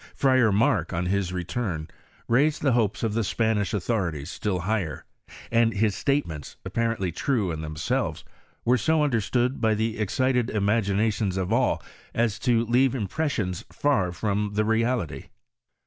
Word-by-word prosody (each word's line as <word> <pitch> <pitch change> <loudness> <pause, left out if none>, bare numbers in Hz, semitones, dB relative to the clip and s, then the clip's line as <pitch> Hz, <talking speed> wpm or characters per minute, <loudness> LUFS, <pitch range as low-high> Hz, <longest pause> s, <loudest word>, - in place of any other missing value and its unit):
Friar 130 -5 +4
Mark, 100 -1 +2
on 85 +1 -1
his 95 0 0
return, 90 -2 -3 0.4
raised 145 +6 +2
the 140 - +3
hopes 115 -4 +1
of 110 -2 0
the 115 +1 +1
Spanish 110 0 0
authorities 90 - -2
still 95 -5 -2
higher, 95 -4 -2 0.5
and 115 -1 +3
his 105 0 +2
statements^ 95 - -2
apparently 115 -6 -1
true 105 - 0
in 80 -1 -4
themselves, 80 0 -2 0.4
were 125 +2 +4
80 140 +8 +1
understood 125 -4 +1
by 110 -1 +3
the* 110 +1 -1
excited 125 +3 +1
imaginations 105 -1 +1
of 95 +3 -1
all, 125 +2 +1 0.3
as 115 -2 +1
to 120 -1 +2
leave 125 +3 +3
impressions 110 - -2
far 105 -12 +1
from 105 +3 -1
the 110 0 +2
reality. 110 - 0
110 Hz, 145 wpm, -26 LUFS, 95-120 Hz, 0.5 s, Friar